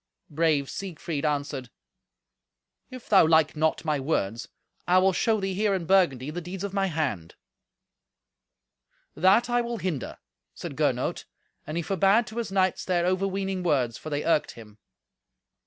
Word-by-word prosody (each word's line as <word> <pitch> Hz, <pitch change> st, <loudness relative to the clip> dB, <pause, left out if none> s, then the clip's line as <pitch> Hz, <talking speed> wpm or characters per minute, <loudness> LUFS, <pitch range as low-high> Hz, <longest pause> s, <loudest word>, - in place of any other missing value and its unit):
Brave 150 Hz, -2 st, +1 dB
Siegfried 165 Hz, -5 st, -5 dB
answered, 140 Hz, -4 st, -2 dB, 1.2 s
"If 255 Hz, -2 st, -11 dB
thou 195 Hz, -6 st, +6 dB
like 160 Hz, -1 st, +3 dB
not 160 Hz, +1 st, 0 dB
my 150 Hz, -2 st, 0 dB
words, 120 Hz, -6 st, -2 dB, 0.4 s
I 180 Hz, +1 st, +4 dB
will 190 Hz, +1 st, +4 dB
show 220 Hz, +3 st, +1 dB
thee 195 Hz, -1 st, -2 dB
here, 205 Hz, +1 st, +1 dB
in 180 Hz, -3 st, -3 dB
Burgundy, 155 Hz, -8 st, +2 dB
the 175 Hz, +3 st, -5 dB
deeds 180 Hz, +3 st, -7 dB
of 200 Hz, -1 st, -4 dB
my 195 Hz, -1 st, +1 dB
hand." 140 Hz, -, -3 dB, 1.8 s
"That 190 Hz, +8 st, +4 dB
I 240 Hz, 0 st, +1 dB
will 235 Hz, 0 st, -4 dB
hinder," 170 Hz, -, -4 dB, 0.4 s
said -, -, -7 dB
Gernot, -, -, -1 dB, 0.4 s
and 155 Hz, -, -4 dB
he 170 Hz, -, -1 dB
forbade 195 Hz, +6 st, +3 dB
to 220 Hz, -, -10 dB
his 230 Hz, -4 st, -3 dB
knights 190 Hz, -2 st, +1 dB
their 175 Hz, -2 st, 0 dB
overweening 190 Hz, +1 st, -1 dB
words, 130 Hz, -9 st, +1 dB
for 155 Hz, -, -7 dB
they 145 Hz, 0 st, -2 dB
irked 165 Hz, -3 st, +1 dB
him. 110 Hz, -2 st, -14 dB
175 Hz, 155 wpm, -26 LUFS, 150-195 Hz, 1.8 s, thou